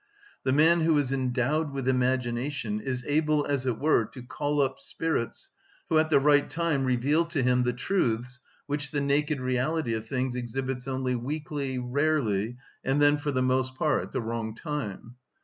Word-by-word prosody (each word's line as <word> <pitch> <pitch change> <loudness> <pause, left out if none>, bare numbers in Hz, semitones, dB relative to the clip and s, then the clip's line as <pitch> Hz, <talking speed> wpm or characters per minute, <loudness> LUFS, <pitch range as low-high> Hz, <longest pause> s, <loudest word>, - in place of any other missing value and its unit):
The 130 - +1
man 160 +5 +5
who 160 -1 +3
is 140 -3 0
endowed 135 +4 0
with 135 -2 -4
imagination 125 -2 0
is 125 +2 -3
able, 150 0 +2
as 140 -2 -1
it 120 -3 0
were, 150 -4 +3
to 120 +3 -11
call 145 +3 -2
up 135 -1 +1
spirits, 160 -8 -3 0.4
who 160 - +4
at 155 0 +2
the 155 - +5
right 145 0 +4
time 165 -5 0
reveal 130 +6 +2
to 165 -5 -1
him 125 0 +3
the 125 0 +1
truths 125 - -1 0.3
which 145 0 -3
the 145 - -1
naked 145 +1 +1
reality 130 +1 0
of 110 0 -4
things 130 0 -1
exhibits 125 +1 -3
only 130 -1 -1
weakly, 140 +1 -3
rarely, 125 -4 0 0.3
and 135 +2 +1
then 145 0 +4
for 145 0 -2
the 130 -1 +1
most 130 0 +1
part 150 +3 +1
at - - -8
the 130 - -1
wrong 115 -1 -3
time. 125 - -5
130 Hz, 180 wpm, -28 LUFS, 125-150 Hz, 0.4 s, man